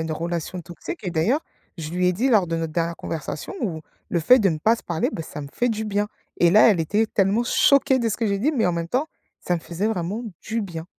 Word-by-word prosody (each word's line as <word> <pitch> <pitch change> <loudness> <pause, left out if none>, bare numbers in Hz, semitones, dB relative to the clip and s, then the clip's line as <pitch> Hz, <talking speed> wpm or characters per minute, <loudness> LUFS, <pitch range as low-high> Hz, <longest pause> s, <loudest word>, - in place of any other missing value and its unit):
une 160 - -4
relation 170 +2 -3
toxique 175 - -8
et 180 - -3
d'ailleurs 195 - +1 0.4
je 155 -1 -6
lui 180 +1 +1
ai 180 - +4
dit 240 +9 0
lors 210 -7 +4
de 165 0 -2
notre 165 -1 -3
dernière 170 0 -1
conversation 155 - -5
où 165 -8 -2 0.3
le 170 - 0
fait 250 +11 +6
de 205 -5 +3
ne 160 -3 -1
pas 225 +8 +3
se - - -12
parler, 165 -2 -1
bah, 165 - -4
ça 155 -1 -8
me 140 - -8
fait 245 - 0
du 220 -1 -2
bien. 205 0 0 0.3
Et 170 - +5
là, 215 +2 +7
elle 195 - +2
était 205 +8 +1
tellement 205 +3 +2
choquée 275 +2 +4
de 235 -2 0
ce 215 - -2
que 230 - 0
j'ai 200 -1 0
dit, 290 +10 +1
mais 240 -6 +1
en 180 - +1
même 170 0 -2
temps, 270 - 0 0.3
ça 180 - -1
me - - -6
faisait 175 +6 -2
vraiment 205 +2 -2 0.2
du 230 0 -3
bien. 170 -3 -6
185 Hz, 265 wpm, -23 LUFS, 165-225 Hz, 0.4 s, là